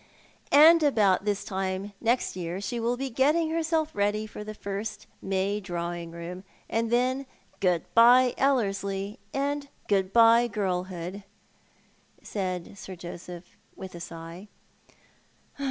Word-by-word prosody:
"And 320 +3 +8
about 210 -10 +3
this 205 -1 0
time 190 +1 -3
next 235 -2 +1
year 175 0 -4
she 220 +4 -3
will 235 +2 0
be 270 0 -3
getting 305 +6 +2
herself 320 -1 0
ready 205 +1 0
for 210 -1 -8
the 215 0 -7
first 200 +2 -5 0.2
May 195 +2 -1
Drawing 175 -3 -4
room, 170 +2 -8 0.2
and 225 0 -1
then 255 +3 +1 0.3
good 180 -3 +2
bye 245 +2 +7
EUerslie, 200 -5 0
and 285 +1 -2 0.2
good 195 -2 +1
bye 230 +1 +6
girlhood," 185 -3 -3 1.0
said 185 -1 -4
Sir 190 - -8
Joseph 175 0 -9 0.2
with 190 -1 -9
a 170 - -8
sigh. 170 +3 -9
205 Hz, 125 wpm, -27 LUFS, 185-240 Hz, 1.0 s, And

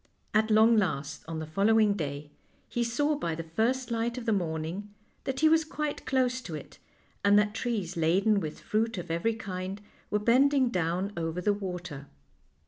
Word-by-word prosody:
At 220 +1 +3
long 220 +1 +6
last, 155 -7 -1
on 165 0 -4
the 160 - -4
following 205 +6 +3
day, 145 -5 -5 0.4
he 240 - -1
saw 290 +6 +1
by 170 - -2
the 165 - -5
first 230 +10 0
light 235 +1 -1
of 245 - -5
the 225 - +2
morning 170 +2 -3 0.3
that 265 0 -2
he 315 - +6
was 320 0 +5
quite 300 -2 -4
close 255 -1 +1
to 170 -9 -6
it, 150 - -10 0.4
and 200 0 +6
that 210 0 +3
trees 220 -6 -2
laden 190 +6 +3
with 155 -5 -6
fruit 225 0 0
of 175 -2 -5
every 190 +7 0
kind 190 -2 -5 0.3
were 210 - +1
bending 260 +4 +4
down 180 0 -1
over 165 0 -2
the 205 +3 +2
water. 180 -8 -6
205 Hz, 180 wpm, -29 LUFS, 170-235 Hz, 0.4 s, long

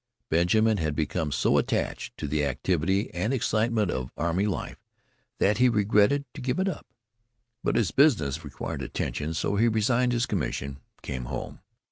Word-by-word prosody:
Benjamin 105 +7 +3
had 80 -4 -1
become 80 0 -1
so - - +3
attached - - -2
to 75 - -4
the 75 +1 0
activity 90 - 0
and 95 +7 -1
excitement 110 -5 +1
of 65 -1 -3
array 85 +5 0
life 100 - -4 0.5
that 105 +4 +2
he 125 0 +6
regretted 105 +6 +3
to 145 - -8
give 125 0 -1
it 190 +1 +1
up, 190 - -4 0.8
but - - +1
his 110 -7 +2
business 80 - +3
required 70 -4 -5
attention, 80 +2 -3
so 100 +5 0
he 115 +3 +4
resigned 120 +3 +2
his 120 0 +1
commission 70 - -2
and 70 - -31
came 65 -2 -4
home. - - -6
100 Hz, 165 wpm, -27 LUFS, 80-115 Hz, 0.8 s, he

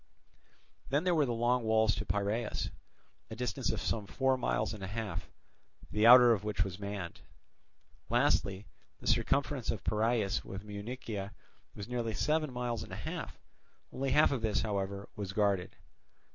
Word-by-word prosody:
Then 145 +4 +2
there 180 -1 +2
were 150 -4 +3
the - - -1
Long 120 +2 +2
Walls 110 -1 +3
to 105 - -4
Piraeus, 105 +3 -1 0.6
a 110 - -6
distance 120 -4 -2
of - - -2
some 105 -3 -2
four 135 +3 +2
miles 110 -4 0
and 105 -3 -8
a - - -3
half, 100 -4 -4 0.6
the 105 +2 +4
outer 120 -1 +10
of 105 -3 -2
which 105 -2 0
was 95 0 -6
manned. 100 -4 -5 0.9
Lastly, 95 +2 +2 0.3
the - - -13
circumference 140 -2 +1
of 110 - -2
Piraeus 110 -2 +1
with 95 +1 -7
Munychia 105 -1 -5 0.4
was 100 0 -7
nearly 120 -3 -2
seven 155 -1 +1
miles 120 -2 -2
and - - -9
a - - -5
half; - - -5 0.6
only 135 +1 -1
half 150 +4 +5
of 135 -4 -1
this, 110 -2 +1
however, 100 -1 -2
was 100 -2 -5
guarded. 100 -3 +1
110 Hz, 160 wpm, -32 LUFS, 100-125 Hz, 0.9 s, outer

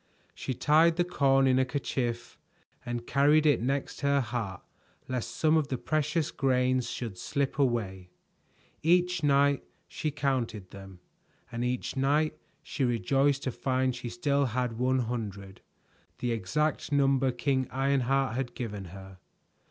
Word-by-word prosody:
She 130 - -4
tied 160 +5 +4
the 175 - +2
corn 135 -6 +3
in 130 -1 +4
a - - +4
kerchief 125 -3 -3 0.4
and 120 -2 -4
carried 150 +3 +4
it 145 -6 +4
next 135 +3 -2
her 140 0 +3
heart 115 -8 -4 0.4
lest 125 -2 -3
some 155 0 +2
of 155 -3 +1
the 130 - -2
precious 155 +2 -1
grains 130 -2 +1
should 110 -7 -5
slip 140 +6 -2
away. 100 -9 0 0.7
Each 180 +1 +3
night 140 -1 +3 0.2
she 155 - -3
counted 125 -9 -2
them, 95 -2 -11 0.5
and 115 +1 -3
each 125 0 -2
night 145 +4 +1 0.3
she 140 - -3
rejoiced 135 +4 +2
to 130 - -1
find 130 0 0
she 125 0 -6
had 115 - -6
still 140 +3 +1
one 125 +2 0
hundred, 105 -5 -5 0.6
the 120 0 -2
exact 130 +10 -1
number 135 -2 +3
King 130 +1 0
Ironheart 135 -1 +1
had 125 -2 -3
given 105 -5 -5
her. 95 +1 -11
130 Hz, 145 wpm, -29 LUFS, 120-140 Hz, 0.7 s, tied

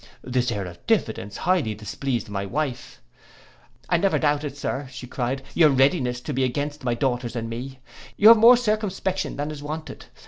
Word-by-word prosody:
—This 125 -1 0
air 100 -4 -3
of 85 -1 -11
diffidence 100 +2 0
highly 170 -13 +1
displeased 120 +3 -3
my 100 -1 -3
wife. 120 - -4 0.8
'I 175 - +3
never 195 +3 +2
doubted, 145 -1 0
Sir,' 135 -1 -3 0.2
cried 130 +2 -2
she, - - -6
'your 155 -3 +7
readiness 130 -2 +2
to 150 - -5
be 130 0 0
against 145 +3 -2
my 120 -1 0
daughters 125 -2 -1
and 115 -1 -3
me. 125 +4 -6 0.4
You 215 - +8
have 230 - +9
more 235 +3 +8
circumspection 205 -5 -1
than 145 +2 -3
is 150 -2 -8
wanted. 155 +2 -7
135 Hz, 175 wpm, -24 LUFS, 120-155 Hz, 0.8 s, have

